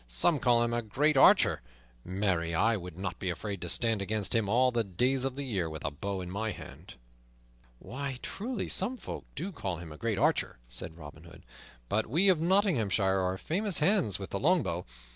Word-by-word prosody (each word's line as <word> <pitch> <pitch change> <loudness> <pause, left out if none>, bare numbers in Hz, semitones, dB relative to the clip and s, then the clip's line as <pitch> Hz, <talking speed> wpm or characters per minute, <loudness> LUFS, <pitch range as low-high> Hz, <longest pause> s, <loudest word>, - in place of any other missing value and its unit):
Some 140 - +2
call 120 -2 +3
him 120 0 -1
a 120 - 0
great 140 +8 +1
archer; 135 - +5 0.4
marry, 90 -3 -1
I 115 +7 +3
would 90 -4 -7
not 90 -2 -4
be 95 - -2
afraid 100 +1 -4
to 85 - -4
stand 115 +2 +1
against 105 0 -1
him 110 -3 +1
all 125 +3 +4
the 120 -2 +1
days 125 +7 0
of 135 -1 -2
the 140 - -4
year 95 -11 -2
with 80 -1 -7
a 70 - -1
bow 95 +6 -4
in 90 0 -7
my 110 +3 -2
hand." 100 - -10 0.8
"Why, 135 - -5
truly, 235 +2 -3
some 235 +7 +2
folk - - -7
do 175 +8 -4
call 100 - -4
him 85 -1 -9
a 75 - -9
great 115 0 -1
archer," - - +1
said - - -7
Robin 75 0 -11
Hood, 80 -1 -14 0.4
"but 110 - 0
we 170 - +3
of 175 -4 +3
Nottinghamshire 115 - +2
are 95 0 -1
famous 195 - 0
hands 160 - +2
with 95 - -8
the 100 - -2
longbow. 135 - +1
110 Hz, 200 wpm, -30 LUFS, 90-140 Hz, 0.8 s, archer